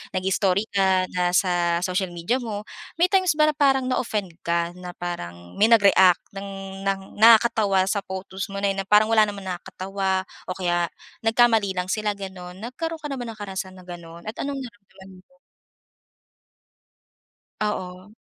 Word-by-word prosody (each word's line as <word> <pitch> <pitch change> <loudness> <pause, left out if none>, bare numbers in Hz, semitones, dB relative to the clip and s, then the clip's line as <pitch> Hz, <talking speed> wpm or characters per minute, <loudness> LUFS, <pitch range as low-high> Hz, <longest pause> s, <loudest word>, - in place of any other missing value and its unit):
nag-i-story 190 +1 +1
ka 190 -2 +2
na 180 0 0
sa 175 -2 +2
social 185 +1 0
media 175 +10 0
mo, 215 -4 -5 0.3
may 350 +2 +2
times 370 -5 +3
ba 305 0 +4
parang 270 -3 +2
na-offend 210 -7 -1
ka 170 0 0
na 180 -1 -8
parang 85 - -7
may 215 - +6
nag-react 195 -5 +6
ng 195 -1 -7
ng 195 0 0 0.2
nakakatawa 220 -4 +5
sa 200 - +1
photos 190 0 -5
mo 200 0 -6
na 200 - +3
'yon 195 - -4
na - - -51
parang 210 +1 +5
wala 220 -1 +6
namang 200 -2 -6
nakakatawa 190 +1 -2 0.2
o 185 - -3
kaya 175 -2 0 0.4
nagkamali 225 -3 +4
lang 180 0 -3
sila 210 +1 0
gano'n. 190 -1 -9
Nagkaroon 320 +7 -5
ka 295 - -5
na 275 - -4
ba 245 - -5
ng 230 - -6
karanasan 190 -2 -5
na 185 - -13
gano'n 170 -1 -10
at 220 - -9
anong 275 -1 -3
naramdaman 205 -5 -13 0.2
mo? 270 - -30 2.3
Oo. 185 -1 -4
195 Hz, 160 wpm, -24 LUFS, 185-225 Hz, 2.3 s, may